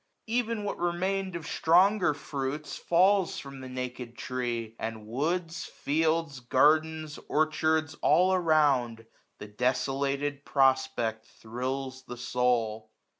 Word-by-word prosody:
Ev*n 230 -2 -1
what 205 - -4
remained 185 +2 -1
Of 170 -2 -5
stronger 180 +2 +3
fruits, 145 +1 -4
falls 190 +2 +3
from 140 -1 -8
the 130 - -8
naked 125 -1 -6
tree; 120 -3 -3
And 110 -1 -5
woods, 165 +8 -2
fields, 160 -1 -1
gardens, 155 +4 +2
orchards, 155 0 +1
all 185 +2 +4
around 145 -10 +2
1000 115 - -24 0.3
The 105 - -9
desolated 135 +5 -1
prospect 130 -5 +1
thrills 130 +3 -5
the 125 - -7
soul. 120 -3 0
140 Hz, 115 wpm, -28 LUFS, 125-165 Hz, 0.3 s, all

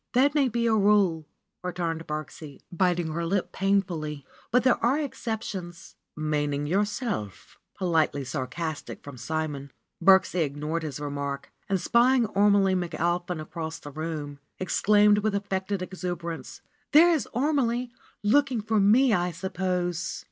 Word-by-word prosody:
"That 275 +3 +4
may 285 -4 +3
be 235 0 -1
a 225 - +3
rule," 200 -7 +3 0.4
returned 170 -2 -3
Birksie, 150 -1 -6
biting 175 -2 +1
her 170 +1 -2
lip 185 +3 -1
painfully, 170 -8 -1 0.2
"but 250 +3 +3
there 255 -2 +2
are 250 +5 +3
exceptions." 215 - -5 0.2
"Meaning 145 -2 -1
yourself 200 - -2
?" - - -43
politely 160 -6 +1
sarcastic 150 +4 -5
from 145 -2 -9
Simon. 145 0 -4 0.3
Birksie 190 -1 +5
ignored 150 +3 -3
his 150 -3 -5
remark, 140 -1 -4 0.2
and 195 -1 +1
spying 240 +6 +4
Ormelie 200 -1 +4
McAlpin 175 -1 -1
across 160 0 -5
the 145 - -10
room, 150 -2 -5 0.2
exclaimed 205 +2 +4
with 210 -1 0
affected 195 -1 -2
ex 185 0 -9
uberance: 170 -2 -5 0.3
"There 335 +4 +8
is 315 -6 0
Ormelie! 250 -2 0 0.3
Looking 255 +2 +3
for 220 0 +1
me, 225 +5 +5
I 180 -2 +1
suppose." 180 0 -2
180 Hz, 135 wpm, -27 LUFS, 155-210 Hz, 0.4 s, There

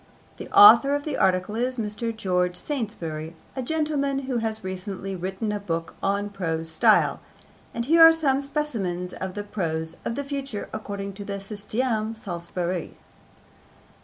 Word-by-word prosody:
The - - -8
author 400 -9 +8
of 290 - -2
the 300 -2 -3
article 185 +2 +1
is 250 +2 -1
Mr. 220 +1 -2
George 180 -5 0
Saintsbury, 170 - -4 0.2
a 260 - -2
gentleman 290 -1 0
who 260 -2 -1
has 220 -2 -2
recently 190 +1 -4
written 190 +4 -3
a 210 - -2
book 165 -4 -3
on 200 +1 0
Prose 165 -4 -2
Style, 160 - +4 0.5
and 235 - -3
here 330 +4 +5
are 325 0 +11
some 285 -4 +1
specimens 215 - -3
of 190 0 -5
the 205 - -3
prose 160 -5 -3
of 230 - -2
the 285 - -2
future 275 -6 -5
according 200 -2 -5
to 205 +1 -8
the 200 - -5
systeme 215 +2 -2
Saintsbury: 175 -2 -4
1. - - -27
205 Hz, 160 wpm, -25 LUFS, 185-260 Hz, 0.5 s, are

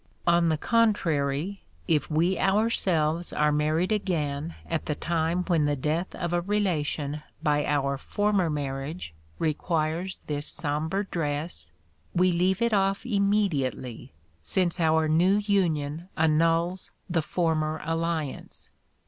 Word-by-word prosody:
On 170 -1 +4
the 160 - +1
contrary, 175 -5 +1 0.3
if 155 -3 +1
we 170 +4 +1
ourselves 180 -6 +1
are 150 0 +2
married 155 +6 +1
again 165 -6 -1
at 165 -1 -3
a 150 - +1
time 165 +2 0
when 170 -5 +2
the 145 0 +1
death 155 +6 -2
of 175 -1 -3
a 175 - +2
relation 155 -7 -1 0.2
by 150 -1 +2
our 140 -2 0
former 205 0 +1
marriage 140 - -4 0.2
requires 165 +3 -1
this 145 0 -2
sombre 155 +6 -1
dress, 150 - -3 0.5
we 180 +1 +4
leave 185 +4 +1
it 235 -1 +1
off 195 +2 +1
immediately, 200 - 0 0.3
since 175 - 0
our 160 -1 +3
new 175 +6 +4
union 175 -6 0
annuls 165 +3 +2 0.2
the 170 -3 +1
former 155 -1 0
alliance. 165 -3 -3
165 Hz, 125 wpm, -27 LUFS, 150-185 Hz, 0.5 s, On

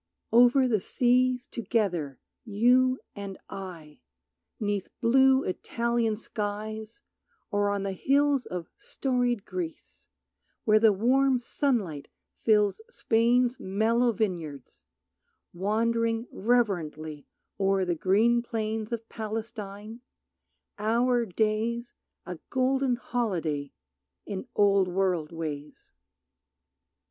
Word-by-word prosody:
Over 245 +3 +6
the 220 -4 +2
seas 250 +4 +2
together, 190 - -1 0.3
you 250 +4 +3
and 200 -2 -6
I, 170 -6 -8 0.6
'Neath 205 -3 -2
blue 265 +2 +4
Italian 235 +3 -1
skies, 215 - -5 0.5
or 205 -1 +1
on 200 -1 -1
the 195 - -2
hills 275 +6 +2
Of 180 -2 -6
storied 245 -5 -1
Greece, 175 -3 -7 0.6
where 215 -1 +5
the 220 -1 +6
warm 255 +6 +3
sunlight 230 - -1 0.3
fills 210 - +2
Spain's 245 - +2
mellow 225 +5 +2
vineyards, 170 - -4 0.7
wandering 225 +4 0
reverently 165 - -1 0.3
O'er 195 -1 +2
the 175 - 0
green 210 +8 +3
plains 220 -2 -3
of 230 -1 -4
Palestine, 220 0 -6 0.8
our 235 +2 +2
days 220 +4 -1 0.3
A 180 -3 -7
golden 260 0 +1
holiday 170 - -2 0.5
in 200 +4 -5
Old 200 -2 +4
World 180 -4 0
ways. 150 -3 -7
220 Hz, 95 wpm, -28 LUFS, 190-240 Hz, 0.8 s, Over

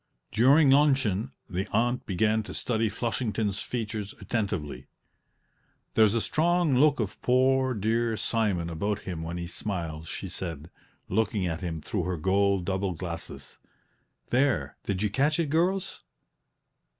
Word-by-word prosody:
During 135 +6 +5
luncheon 130 -6 +3 0.2
the 95 +2 -3
aunt 120 +3 +1
began 110 +4 +2
to - - -6
study 115 -2 0
Flushington's 110 -2 -2
features 110 -4 -4
attentively. 75 - -3 1.1
"There's 110 -1 +4
a 115 - +2
strong 170 +1 +2
look 145 +2 +4
of 105 -4 -3
poor, 130 0 +3
dear 110 +2 0
Simon 105 -8 0
about 100 +5 -2
him 85 -3 -5
when 85 +2 -4
he 85 - -4
smiles," 85 -3 -4
she - - -5
said, 80 -3 -6 0.4
looking 105 -1 0
at 80 -2 -2
him 85 -3 -3
through 75 - -3
her 90 -1 -2
gold 95 +2 +2
double 95 0 -1
glasses. 85 0 -7 0.7
"There, 120 - +1
did 100 0 -1
you 105 - 0
catch 145 +7 +2
it, 160 -4 0
girls? 185 +4 0
105 Hz, 140 wpm, -28 LUFS, 90-125 Hz, 1.1 s, During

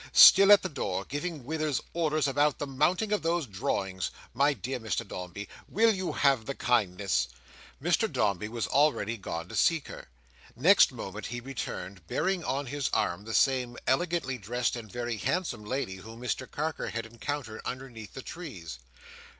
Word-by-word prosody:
"Still 195 +1 +10
at 205 - +8
the - - 0
door, 100 - -3
giving 145 -2 -4
Withers 155 -1 -1
orders 155 -3 +1
about 145 +1 +2
the 145 - -3
mounting 155 +10 +1
of 210 - +1
those 165 -1 0
drawings! 95 -3 -2 0.2
My 140 +4 +4
dear 130 +1 -4
Mr 110 0 -2
Dombey, 90 +2 -6 0.2
will 225 +2 +4
you 185 -2 -3
have 135 -6 +2
the 140 - -3
kindness"— 95 - +1 0.5
Mr - - +1
Dombey 100 0 0
was 115 -1 -2
already 120 -2 +2
gone 85 -5 -5
to - - -7
seek 160 +7 +2
her. - - -9 0.5
Next 170 - +6
moment 110 -4 -6
he 120 +1 -4
returned, 100 -8 -6
bearing 185 - 0
on 140 -1 -1
his 140 +1 -2
arm 90 +4 0
the 110 - -3
same 125 -3 +2
elegantly 135 -2 0
dressed 120 +5 -1
and 110 -4 -8
very 120 -2 -3
handsome 140 - -1
lady 105 -4 -3
whom 110 +4 -11
Mr 125 0 -3
Carker 155 +1 -3
had 115 0 -4
encountered 120 0 -5
underneath 120 -5 -7
the 135 - -6
trees. 90 - -8
125 Hz, 165 wpm, -29 LUFS, 105-150 Hz, 0.5 s, Still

